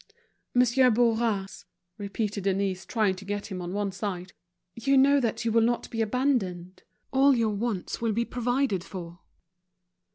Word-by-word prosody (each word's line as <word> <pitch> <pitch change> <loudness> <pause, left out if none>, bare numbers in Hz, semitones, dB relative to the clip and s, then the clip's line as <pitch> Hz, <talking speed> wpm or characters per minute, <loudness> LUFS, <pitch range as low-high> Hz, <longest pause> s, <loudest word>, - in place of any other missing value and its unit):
"Monsieur 250 +1 +5
Bourras," 225 -4 0 0.3
repeated 205 0 -3
Denise, 195 -1 -1
trying 215 -5 +1
to 195 - -9
get 205 +1 -4
him 185 -1 -4
on 175 0 -5
one 200 0 -1
side, 185 -2 -5 0.4
"you 275 +4 +2
know 280 +2 +5
that 235 -2 -2
you 230 - +1
will 230 +1 +4
not 235 +1 0
be 225 - -2
abandoned. 210 -7 -1 0.3
All 270 +1 +5
your 225 -3 +1
wants 205 -2 -3
will 230 -1 +1
be 230 +3 0
provided 245 -5 0
for." 175 -3 -8
220 Hz, 155 wpm, -27 LUFS, 195-240 Hz, 0.4 s, Monsieur